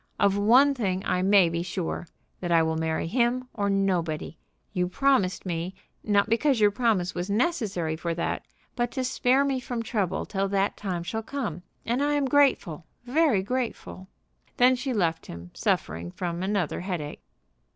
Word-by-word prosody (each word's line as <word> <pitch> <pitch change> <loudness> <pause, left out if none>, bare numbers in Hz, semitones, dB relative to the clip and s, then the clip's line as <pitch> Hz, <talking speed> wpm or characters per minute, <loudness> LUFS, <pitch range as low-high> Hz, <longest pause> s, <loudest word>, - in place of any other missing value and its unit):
Of 200 -1 +3
one 245 +8 +5
thing 195 -6 -2
I 180 - +1
may 195 -1 +5
be 170 0 -2
sure, 175 -1 -4 0.3
that 175 -1 -3
I 165 -1 +5
will 160 0 0
marry 160 0 -1
him 245 +6 0
or 200 -2 -1
nobody. 180 -6 0 0.4
You 180 -2 0
promised 255 -7 +1
me, 175 +1 -3 0.3
not 205 -1 +2
because 235 +3 +2
your 210 -1 +5
promise 205 -6 +1
was 175 +2 -4
necessary 200 - 0
for 170 +1 -3
that, 170 - -2 0.3
but 240 -1 0
to 260 - -1
spare 260 +1 +2
me 270 -2 0
from 245 -2 -4
trouble 200 -6 -1
till 195 -1 -1
that 195 0 0
time 180 -4 -3
shall 220 +6 -3
come. 215 - -4 0.2
And 240 +4 0
I 290 +1 +2
am 290 -1 +1
grateful, 255 - +2 0.2
very 255 -6 +2
grateful." 230 -5 -4 0.5
Then 250 +1 +5
she 260 +2 -3
left 170 -8 0
him 85 +1 -9
suffering 85 +3 -1
from 170 - -4
another 190 -4 -1
headache. 175 -5 -5
200 Hz, 170 wpm, -26 LUFS, 175-245 Hz, 0.5 s, one